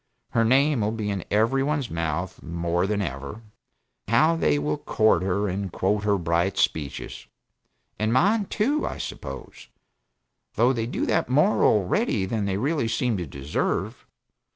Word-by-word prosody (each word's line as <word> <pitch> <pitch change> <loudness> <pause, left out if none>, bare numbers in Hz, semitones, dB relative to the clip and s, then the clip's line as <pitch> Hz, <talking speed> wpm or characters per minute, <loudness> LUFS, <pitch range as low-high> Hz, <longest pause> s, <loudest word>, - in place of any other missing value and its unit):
Her 115 - +2
name 135 +2 +3
will 105 - +1
be 110 -2 -3
in 95 -3 -3
every 115 +6 +2
one's 145 -2 -1
mouth 85 +2 -3
more 85 +2 -1
than 105 -1 0
ever, 70 -4 -5
and 110 +2 -13 0.6
how 135 +10 +4
they 75 - +2
will 75 +1 -1
court 110 -5 +2
her 95 +2 0
and 95 0 -3
quote 100 +4 0
her 105 -1 +3
bright 85 +2 0
speeches. 75 -4 -2 0.7
And 110 +1 +1
mine, 200 - +3
too, 275 +11 0
I - - -3
suppose; - - -8 0.9
though 125 +3 +3
they 115 -2 -2
do - - -2
that - - 0
more 150 +11 +3
already, 105 - +2
than 105 +1 -2
they 95 -1 -1
really 140 +2 0
seem 115 +1 0
to 90 -3 -4
deserve. 70 +2 -3
105 Hz, 160 wpm, -25 LUFS, 90-125 Hz, 0.9 s, how